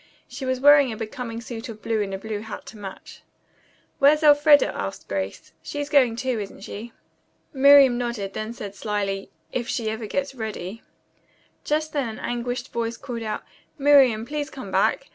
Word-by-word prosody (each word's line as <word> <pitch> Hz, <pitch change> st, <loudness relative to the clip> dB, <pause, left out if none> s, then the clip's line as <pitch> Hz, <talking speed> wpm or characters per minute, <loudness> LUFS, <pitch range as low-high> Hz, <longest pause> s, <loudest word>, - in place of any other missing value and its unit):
She 260 Hz, +2 st, -7 dB
was 260 Hz, 0 st, 0 dB
wearing 285 Hz, -1 st, +6 dB
a 220 Hz, -, -6 dB
becoming 230 Hz, +1 st, -5 dB
suit 235 Hz, +1 st, -7 dB
of 215 Hz, -1 st, -10 dB
blue 225 Hz, -2 st, 0 dB
and 200 Hz, -1 st, -3 dB
a 195 Hz, -, -3 dB
blue 215 Hz, +1 st, -5 dB
hat 220 Hz, +1 st, -8 dB
to 220 Hz, -, -11 dB
match. 195 Hz, -2 st, -9 dB, 0.8 s
"Where's 300 Hz, +3 st, +5 dB
Elfreda?" 290 Hz, 0 st, +6 dB
asked -, -, -5 dB
Grace. -, -, -4 dB
"She's 290 Hz, 0 st, -5 dB
going, 255 Hz, -6 st, +4 dB
too, 250 Hz, -1 st, -1 dB
isn't 200 Hz, -1 st, -7 dB
she?" 215 Hz, +3 st, -8 dB, 0.6 s
Miriam 275 Hz, -2 st, +7 dB
nodded, 235 Hz, -5 st, -3 dB
then 215 Hz, +1 st, -4 dB
said 205 Hz, -4 st, -7 dB
slyly, 200 Hz, -1 st, -3 dB, 0.2 s
"If 240 Hz, -2 st, -3 dB
she 220 Hz, -3 st, -1 dB
ever 220 Hz, 0 st, -5 dB
gets 280 Hz, +4 st, -2 dB
ready." 220 Hz, -3 st, -6 dB, 0.8 s
Just 310 Hz, +1 st, -1 dB
then 275 Hz, -5 st, -1 dB
an 220 Hz, -, -7 dB
anguished 245 Hz, +2 st, -4 dB
voice 230 Hz, 0 st, -2 dB
called 245 Hz, -4 st, -6 dB
out, 215 Hz, -1 st, -4 dB, 0.3 s
"Miriam, 270 Hz, -6 st, +5 dB
please 295 Hz, +2 st, -3 dB
come -, -, -8 dB
back. -, -, +1 dB
235 Hz, 175 wpm, -24 LUFS, 215-275 Hz, 0.8 s, Miriam